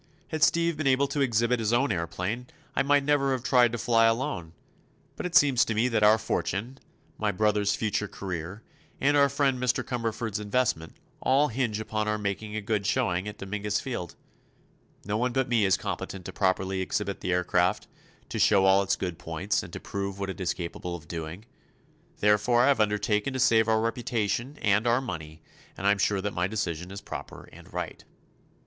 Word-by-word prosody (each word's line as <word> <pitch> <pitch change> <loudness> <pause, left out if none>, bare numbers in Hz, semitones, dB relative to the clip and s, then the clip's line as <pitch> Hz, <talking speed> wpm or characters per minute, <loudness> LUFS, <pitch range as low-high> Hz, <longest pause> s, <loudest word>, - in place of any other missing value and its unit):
Had 155 -1 -3
Steve 170 +1 +3
been 155 -2 -1
able 135 +1 +3
to 145 - -1
exhibit 120 -1 +2
his 110 -1 0
own 120 +1 +2
aëroplane 90 +7 -3 0.3
I - - +3
might 145 0 +3
never 140 -1 +2
have 130 -2 -3
tried 125 -3 +4
to 120 - -3
fly 115 +1 +3
alone; 115 - -1 0.6
but - - -3
it 180 - -7
seems 140 -8 +6
to 115 - -2
me 115 +4 +2
that 115 -3 +1
our 105 +1 +6
fortune, 110 +4 -3 0.4
my 105 -1 +1
brother's 105 0 +1
future 105 -1 -1
career, 95 +2 -6 0.4
and 145 +2 +3
our 140 -1 +5
friend 135 -2 +1
Mr. 125 -2 +1
Cumberford's 115 -3 -3
investment, 105 -7 -1 0.2
all 140 +3 +3
hinge 115 -3 -1
upon 110 0 -2
our 105 0 0
making 105 +1 -3
a 110 - -2
good 105 -1 -1
showing 105 -6 0
at 105 0 -7
Dominguez 105 +1 -2
Field. 120 -10 -5 0.9
No 105 +1 -1
one 125 +2 0
but 130 0 +1
me 115 -4 +2
is 95 - +3
competent 95 -2 -5
to - - -7
properly 95 0 0
exhibit 100 +1 -2
the 90 - -1
aircraft, 90 +2 +1 0.4
to - - -3
show 95 -2 +5
all 95 +1 +5
its 95 -1 +1
good 90 -3 -4
points 85 +5 -1
and 90 - -9
prove 100 -1 -4
what 100 -1 -2
it 95 - -8
is 90 - 0
capable 85 0 -5
of 80 -2 -11
doing. 85 +5 -6 0.8
Therefore 105 +4 +4
I 135 - +5
have 140 -5 +3
undertaken 105 +3 +1
to 130 - -3
save 110 -2 +4
our 110 0 +3
reputation 115 +2 -1
and 105 +2 +3
our 120 +2 +4
money, 80 -10 -7 0.3
and 95 - -5
I 100 - +6
am 100 - +1
sure 100 0 +1
that 105 +1 -3
my 90 +1 0
decision 90 -4 -3
is 100 +1 -7
proper - - -8
and - - -14
right." - - -5
105 Hz, 195 wpm, -27 LUFS, 95-125 Hz, 0.9 s, seems